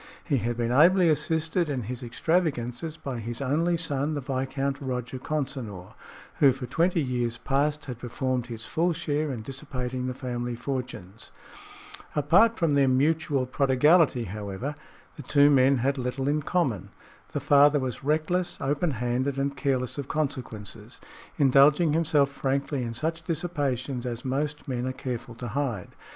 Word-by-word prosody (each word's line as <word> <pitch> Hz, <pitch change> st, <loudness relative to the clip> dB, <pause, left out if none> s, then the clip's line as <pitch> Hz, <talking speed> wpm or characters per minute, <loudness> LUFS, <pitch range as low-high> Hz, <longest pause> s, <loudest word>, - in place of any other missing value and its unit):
He 145 Hz, -5 st, +1 dB
had 120 Hz, 0 st, -2 dB
been 120 Hz, 0 st, 0 dB
ably 170 Hz, +6 st, +5 dB
assisted 160 Hz, +2 st, 0 dB
in 130 Hz, -4 st, -2 dB
his 125 Hz, +4 st, -5 dB
extravagances 145 Hz, +1 st, -1 dB
by 130 Hz, -6 st, -5 dB
his 115 Hz, +1 st, -5 dB
only 160 Hz, +6 st, +1 dB
son, 150 Hz, -2 st, -1 dB
the -, -, -1 dB
Viscount 135 Hz, +1 st, -2 dB
Roger 125 Hz, -1 st, -4 dB
Consinor, 130 Hz, -11 st, -4 dB, 0.5 s
who 140 Hz, -2 st, +7 dB
for 130 Hz, 0 st, -6 dB
twenty 170 Hz, +7 st, +1 dB
years 120 Hz, -4 st, -1 dB
past 145 Hz, +2 st, 0 dB
had 125 Hz, -3 st, -6 dB
performed 125 Hz, 0 st, -2 dB
his 115 Hz, -2 st, -6 dB
full 170 Hz, +2 st, +1 dB
share 150 Hz, -2 st, -1 dB
in 115 Hz, -4 st, -5 dB
dissipating 130 Hz, -1 st, -4 dB
the 125 Hz, -, -3 dB
family 120 Hz, -2 st, -4 dB
fortunes. 125 Hz, -6 st, -6 dB, 0.8 s
Aside 185 Hz, +11 st, +4 dB
from 165 Hz, -4 st, +2 dB
their 140 Hz, -1 st, +4 dB
mutual 140 Hz, 0 st, +2 dB
prodigality, 135 Hz, +2 st, +3 dB
however, 105 Hz, +6 st, -5 dB, 0.4 s
the -, -, -6 dB
two 145 Hz, +2 st, +4 dB
men 135 Hz, 0 st, +5 dB
had 135 Hz, +3 st, 0 dB
little 130 Hz, +2 st, -2 dB
in 150 Hz, +1 st, +1 dB
common. 140 Hz, -, -1 dB, 0.4 s
The -, -, 0 dB
father 145 Hz, +1 st, +5 dB
was 130 Hz, -3 st, -3 dB
reckless, 160 Hz, +5 st, 0 dB
open 145 Hz, +5 st, 0 dB
handed 125 Hz, +3 st, -1 dB
and 140 Hz, 0 st, -1 dB
careless 135 Hz, -2 st, -1 dB
of 140 Hz, -, -4 dB
consequences, 130 Hz, -9 st, -4 dB, 0.4 s
indulging 145 Hz, +3 st, +5 dB
himself 150 Hz, -3 st, +2 dB
frankly 140 Hz, 0 st, -1 dB
in 115 Hz, -1 st, -4 dB
such 160 Hz, +6 st, -2 dB
dissipations 140 Hz, -7 st, -2 dB
as 120 Hz, +1 st, -5 dB
most 145 Hz, +4 st, -2 dB
men 125 Hz, -1 st, -2 dB
are 130 Hz, -, -2 dB
careful 125 Hz, -2 st, -5 dB
to 120 Hz, +1 st, -6 dB
hide. 125 Hz, -7 st, -2 dB
135 Hz, 155 wpm, -27 LUFS, 125-150 Hz, 0.8 s, who